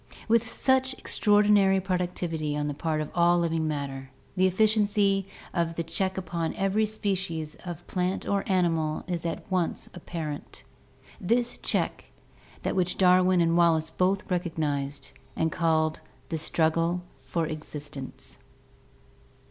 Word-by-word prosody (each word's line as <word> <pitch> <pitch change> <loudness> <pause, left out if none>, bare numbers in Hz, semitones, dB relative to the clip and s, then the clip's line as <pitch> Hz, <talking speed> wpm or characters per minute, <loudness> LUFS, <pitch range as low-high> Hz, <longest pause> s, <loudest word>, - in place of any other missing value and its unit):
With 230 0 +3
such 260 0 +2
extraordinary 205 -4 +4
productivity 175 -5 -2
on 150 0 -1
the 145 - -2
part 155 +1 -1
of 150 - -5
all 175 0 +4
living 165 -2 0
matter, 140 -3 -4 0.3
the 185 0 +4
efficiency 205 -1 +2 0.3
of 170 -2 0
the 170 - -1
check 190 +4 -1
upon 170 -3 -2
every 195 +3 +1
species 190 -7 -2
of 175 -1 -6
plant 180 0 -2
or 200 -1 +1
animal 165 -5 +1
is 170 -2 -3
at 165 - -4
once 180 -2 -1
apparent. 160 -4 -6 0.6
This 235 +5 +1
check - - -1
is - - -27
that - - -1
which 180 -1 0
Darwin 185 -1 +5
and 165 0 +3
Wallace 165 -2 +3
both 190 +3 0
recognized, 150 -5 -2 0.2
and 160 0 0
called 160 -1 +1 0.3
the 165 - -1
struggle 165 +2 +1 0.2
far 135 +5 -2
existence. 150 -3 -8
175 Hz, 130 wpm, -27 LUFS, 160-190 Hz, 0.6 s, Darwin